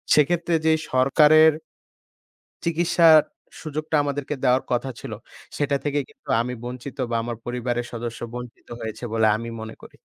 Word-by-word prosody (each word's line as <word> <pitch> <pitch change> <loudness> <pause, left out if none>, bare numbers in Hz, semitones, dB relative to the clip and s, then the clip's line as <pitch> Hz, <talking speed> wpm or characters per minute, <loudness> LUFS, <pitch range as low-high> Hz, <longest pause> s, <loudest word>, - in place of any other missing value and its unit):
সেক্ষেত্রে 170 +3 +2
যেই 160 0 +4
সরকারের 150 +4 +6 1.1
চিকিৎসার 165 -1 +5 0.4
সুযোগটা 155 +1 -2
আমাদেরকে 145 0 -3
দেওয়ার 130 0 +3
কথা 125 +2 0
ছিলো। - - -6 0.4
সেটা 145 -1 +1
থেকেই 145 -1 0
কিন্তু - - -24
আমি 125 +2 -2
বঞ্চিত 125 +2 -7
বা 115 - 0
আমার 120 0 -4
পরিবারের 120 0 -2
সদস্য 115 0 -5
বঞ্চিত 125 -1 -9
হয়েছে 110 +2 -6
বলে 110 -1 +3
আমি 115 +1 -6
মনে 110 0 -7
করি। - - -14
135 Hz, 140 wpm, -23 LUFS, 120-155 Hz, 1.1 s, সরকারের